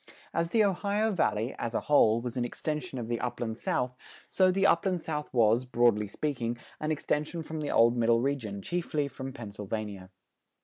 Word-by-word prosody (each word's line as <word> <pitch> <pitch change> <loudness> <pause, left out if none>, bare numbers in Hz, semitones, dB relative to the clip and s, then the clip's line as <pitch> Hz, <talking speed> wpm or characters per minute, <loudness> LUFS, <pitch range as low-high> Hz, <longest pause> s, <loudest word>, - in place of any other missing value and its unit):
As 165 0 0
the 220 +2 +4
Ohio 205 +2 +1
Valley, 120 - 0
as 115 -1 -3
a - - +1
whole, 115 -6 +4
was 120 0 -4
an 125 - 0
extension 150 +5 -3
of 120 -2 -4
the 120 0 -1
Upland 120 -2 -3
South, 125 0 -1 0.3
so 185 -1 +3
the 195 +1 +2
Upland 185 -1 +3
South 150 -2 -4
was, 115 0 +4
broadly 120 -4 +2
speaking, 120 -1 -2 0.2
an 155 0 -1
extension 155 +2 -1
from 160 0 -5
the 145 - -3
old 115 +1 +5
Middle 115 -1 +3
Region, 115 -8 -2
chiefly 165 -4 -1
from 135 0 -7
Pennsylvania. 105 -4 -6
130 Hz, 175 wpm, -29 LUFS, 115-160 Hz, 0.3 s, old